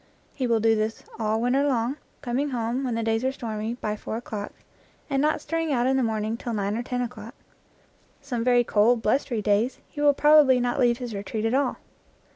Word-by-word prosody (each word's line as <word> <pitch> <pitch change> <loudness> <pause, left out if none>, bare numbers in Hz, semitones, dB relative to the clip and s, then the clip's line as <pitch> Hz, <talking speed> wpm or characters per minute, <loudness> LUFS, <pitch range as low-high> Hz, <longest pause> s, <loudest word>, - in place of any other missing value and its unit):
He 260 -3 -2
will 230 -1 +2
do 225 0 +3
this 215 +1 -2 0.2
all 220 0 0
winter 250 +4 +2
long, 260 -1 0 0.3
com 245 -1 -1
ing 290 +1 0
home, 240 +1 -2
when 245 -3 -1
the 230 - -1
days 225 +1 0
are 260 - +1
stormy, 225 -3 -4
by 215 -3 -3
four 215 +1 -5
o'clock, 215 -3 -6 0.6
and 275 0 +2
not 305 +1 +1
stirring 330 -1 -2
out 245 -3 +1
in 265 +1 +2
the 265 - +2
morning 220 -1 -1
till 240 0 -5
nine 205 -1 -1
or 235 - -1
ten 250 0 -2
o'clock. 235 0 -8 0.8
Some 255 -5 -3
very 245 0 +4
cold, 225 +1 +3
blustery 235 -1 0
days 210 +5 +1
he 295 - -6
will 290 -1 +5
prob 300 +1 +6
ably 260 -1 +4
not 245 0 -1
leave 240 -2 +3
his 245 -3 -6
retreat 205 +2 -4
at 225 - +1
all. 270 -1 +1
240 Hz, 220 wpm, -25 LUFS, 220-260 Hz, 0.8 s, prob